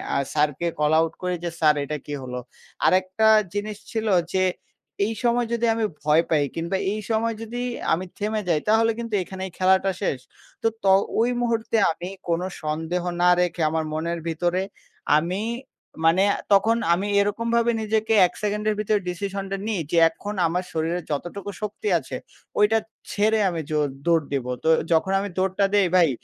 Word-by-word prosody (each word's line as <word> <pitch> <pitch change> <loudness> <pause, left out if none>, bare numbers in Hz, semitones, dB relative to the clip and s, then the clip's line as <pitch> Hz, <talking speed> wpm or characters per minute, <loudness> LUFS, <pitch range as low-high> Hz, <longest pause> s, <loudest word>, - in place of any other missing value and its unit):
আ - - +3 0.2
স্যারকে 150 +2 +1
call 150 +1 +2
out 165 0 +1
করি 180 0 -1
যে, 170 - -1
"স্যার, 155 -1 +5
এটা 150 +2 -3
কী 145 - -6
হলো?" 125 0 -5 0.5
আরেকটা 185 +4 +3 0.3
জিনিস 205 0 -3
ছিল 220 -1 -2 0.3
যে, 190 0 +2 0.6
এই 220 - -2
সময় 240 0 +2
যদি 235 0 +1
আমি 225 -1 0 0.2
ভয় 155 +2 +4
পাই 155 -3 +3
কিংবা 170 +3 -1 0.2
এই 215 - -3
সময় 225 0 +1
যদি 235 +2 -5 0.3
আমি 175 +3 -1
থেমে 215 +1 -1
যাই 160 -3 +2
তাহলে 225 +1 +4
কিন্তু 230 -2 -5
এখানেই 190 0 -6
খেলাটা 190 +1 +3
শেষ। 145 -9 -1 0.4
তো, - - +2 0.2
ত - - -6 0.3
ওই 235 +2 +3
মুহূর্তে 230 -1 0
আমি 175 +3 -6 0.2
কোনো 170 +2 0 0.2
সন্দেহ 160 +3 -2 0.2
না 180 - +5
রেখে 175 -1 -1
আমার 160 0 -1
মনের 170 +2 -2
ভিতরে 175 +3 0 0.6
আমি 175 +6 -1 0.6
মানে 175 +4 +5 0.3
তখন 220 +4 +4 0.2
আমি 190 +4 -1
এরকমভাবে 230 +3 +1
নিজেকে 220 +1 0
১ - - -15
সেকেন্ডের 210 +1 0
ভিতরে 210 0 +1
ডিসিশনটা 195 +2 -4
নিই 210 -6 -1
যে, 170 - +1 0.5
"আমার 180 +3 -1
শরীরে 165 +2 -1
যতটুকু 175 +7 -4
শক্তি 210 - -4
আছে, - - -8 0.4
ওইটা 210 +2 +4 0.3
ছেড়ে 215 +2 +2
আমি 165 -2 -3
জোর 150 -1 +2 0.2
দৌড় 165 -3 +3
দেব।" 135 -3 -1 0.2
তো 160 - +2 0.2
যখন 165 +4 +3
আমি 200 +1 -3
দৌড়টা 190 +1 +1
দেই 200 -3 +4
ভাই, 170 -4 +5
190 Hz, 165 wpm, -24 LUFS, 165-215 Hz, 0.6 s, স্যার